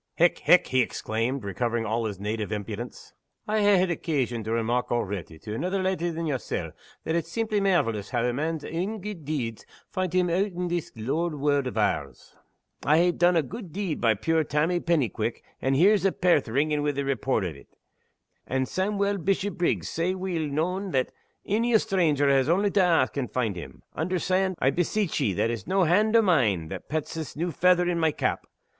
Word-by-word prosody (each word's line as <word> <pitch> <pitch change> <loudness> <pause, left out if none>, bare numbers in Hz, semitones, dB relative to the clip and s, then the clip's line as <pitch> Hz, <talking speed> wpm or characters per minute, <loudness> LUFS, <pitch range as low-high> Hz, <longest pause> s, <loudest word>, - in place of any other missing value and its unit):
"Hech! 175 +1 +3
hech!" 180 - +4
he 130 0 +3
exclaimed, 115 +3 -2
recovering 115 +3 -1
all 115 +1 -1
his 100 -3 -4
native 105 +1 -3
impudence, 105 +3 -6 0.3
"I 215 0 +1
hae 205 -1 +5
had 185 0 +2
occasion 130 -9 -1
to 110 - -3
remark 115 +2 0
already, 100 -8 -3
to 105 +7 -7
anither 185 - -1
leddy 185 -2 0
than 165 0 -3
yersel', 135 -6 -3 0.3
that 160 - -2
it's 165 0 -1
seemply 215 +1 0
mairvelous 115 - +1
hoo 125 - -2
a 120 +1 +1
man's 155 +3 -2
ain 190 +7 -3
gude 195 -6 -7
deeds 125 -7 -3 0.3
find 185 -2 -1
him 180 0 +2
oot 185 +3 0
in 180 0 -3
this 175 -2 -2
lower 150 +8 -2
warld 145 -1 +1
o' 115 - -3
ours. 70 - -2 0.5
I 150 - +4
hae 175 +1 +4
dune 175 +1 +3
a 165 - +3
gude 190 - -8
deed 190 -3 -3
by 115 -2 +4
pure 160 +9 +1
Tammy 155 +4 +1
Pennyquick, 160 - -1 0.2
and 135 0 +1
here's 195 +7 +4
a' 195 - +3
Pairth 175 -8 +2
ringing 145 +6 +1
wi 145 0 0
the 140 0 -2
report 130 -4 0
o' 90 - -1
it; 70 -3 -13 0.8
and 130 +1 0
Sawmuel 200 +1 0
Bishopriggs 195 -1 0
sae 175 +3 -1
weel 180 -5 -2
known 180 +7 -1
that 130 -1 +1 0.4
ony 225 +3 +3
stranger 160 -9 +1
has 135 0 +3
only 195 +4 +2
to 200 - +3
ask, 165 -7 +2
and 130 -3 -2
find 115 -6 -1
him. 85 - -9
Understand, 185 +3 0
I 130 - +2
beseech 180 +3 0
ye, 100 - +1
that 115 +6 0
it's 115 +3 -5
no 190 +1 +2
hand 210 +7 +3
o' 225 - +6
mine 110 - +2
that - - -7
pets 155 0 -2
this 160 -2 -6
new 170 +3 -2
feather 180 +2 +3
in 175 -1 0
my 160 -1 +3
cap. - - -2
160 Hz, 195 wpm, -26 LUFS, 120-185 Hz, 0.8 s, o